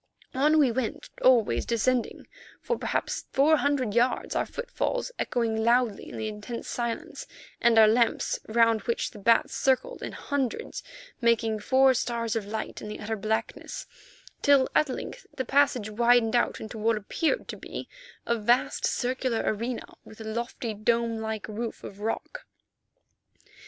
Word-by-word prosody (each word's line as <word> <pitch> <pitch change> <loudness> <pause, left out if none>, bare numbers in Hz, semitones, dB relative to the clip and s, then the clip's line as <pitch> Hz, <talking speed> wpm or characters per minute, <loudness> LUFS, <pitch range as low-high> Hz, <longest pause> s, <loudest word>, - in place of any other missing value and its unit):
On 300 +4 +3
we 280 -5 +5
went, 235 -1 -3
always 245 -4 +4
descending, 240 +1 0 0.3
for 475 - -1
perhaps - - -2
four 300 +4 +4
hundred 280 -7 0
yards, 240 +2 +1
our - - 0
footfalls - - -3
echoing 225 -2 0
loudly 235 -2 +2
in - - -8
the 220 - -3
intense 215 +3 -6
silence, 235 -1 -4 0.3
and 235 -1 +4
our 220 -1 +8
lamps, 230 +1 +2
round 230 -1 +3
which 235 +3 -2
the 210 - -11
bats 230 +3 +3
circled 270 - +1
in - - -5
hundreds, 275 -5 -3 0.4
making 230 -2 +2
four 260 +5 +4
stars 230 -2 -1
of 215 -3 -2
light 220 +1 -5
in - - -7
the 210 - -6
utter 220 +2 -3
blackness, 220 +1 -3 0.6
till 280 -2 +5
at 305 - +3
length - - -6
the 260 - -2
passage 255 -5 +2
widened 235 +1 +3
out 240 - +1
into 220 0 -7
what 225 +1 +2
appeared 320 - -1
to - - -4
be - - -7 0.4
a 235 - +1
vast 235 +3 +2
circular 250 -2 -1
arena, 230 +3 -2 0.2
with 220 - -14
a - - -6
lofty 230 +1 -4
dome 230 +2 0
like 220 -3 -4
roof 220 +2 -5
of 200 - -9
rock. 225 - -4
235 Hz, 155 wpm, -27 LUFS, 220-260 Hz, 0.6 s, our